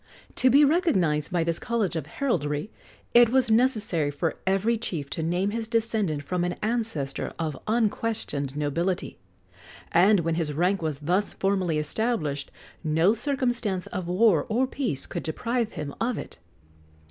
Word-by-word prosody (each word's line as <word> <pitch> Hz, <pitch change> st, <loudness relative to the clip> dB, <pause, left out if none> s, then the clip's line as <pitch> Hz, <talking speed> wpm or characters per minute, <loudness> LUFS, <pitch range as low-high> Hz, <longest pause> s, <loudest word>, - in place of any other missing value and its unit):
To 260 Hz, -, +4 dB
be 285 Hz, +4 st, +7 dB
recognized 190 Hz, -, +2 dB
by 175 Hz, -2 st, +1 dB
this 165 Hz, 0 st, -1 dB
college 235 Hz, -7 st, -1 dB
of 155 Hz, -3 st, -3 dB
heraldry, 150 Hz, -, -1 dB, 0.4 s
it 240 Hz, -1 st, +7 dB
was 255 Hz, -2 st, +2 dB
necessary 215 Hz, -, +2 dB
for 150 Hz, +3 st, -2 dB
every 195 Hz, +5 st, +2 dB
chief 165 Hz, -11 st, -4 dB
to -, -, -3 dB
name 175 Hz, +5 st, 0 dB
his 225 Hz, 0 st, -3 dB
descent 220 Hz, -, 0 dB
from 180 Hz, +3 st, -1 dB
an 175 Hz, 0 st, 0 dB
ancestor 220 Hz, -, -2 dB
of 160 Hz, -3 st, -2 dB
unquestioned 215 Hz, -, -1 dB
nobility; 170 Hz, +5 st, -1 dB, 0.7 s
and 190 Hz, +3 st, +5 dB
when 165 Hz, 0 st, 0 dB
his 160 Hz, -3 st, -1 dB
rank 180 Hz, +5 st, +1 dB
was 155 Hz, -3 st, -2 dB
thus 175 Hz, +8 st, 0 dB
formally 190 Hz, -5 st, 0 dB
established, 150 Hz, -, -1 dB, 0.3 s
no 160 Hz, +5 st, +3 dB
circumstance 240 Hz, -7 st, -1 dB
of 180 Hz, -2 st, -5 dB
war 185 Hz, -1 st, +3 dB
or 240 Hz, +4 st, +2 dB
peace 255 Hz, -, -2 dB
could -, -, -5 dB
deprive 230 Hz, +7 st, -2 dB
him 145 Hz, -2 st, -5 dB
of 240 Hz, 0 st, 0 dB
it. -, -, -8 dB
190 Hz, 150 wpm, -26 LUFS, 160-230 Hz, 0.7 s, be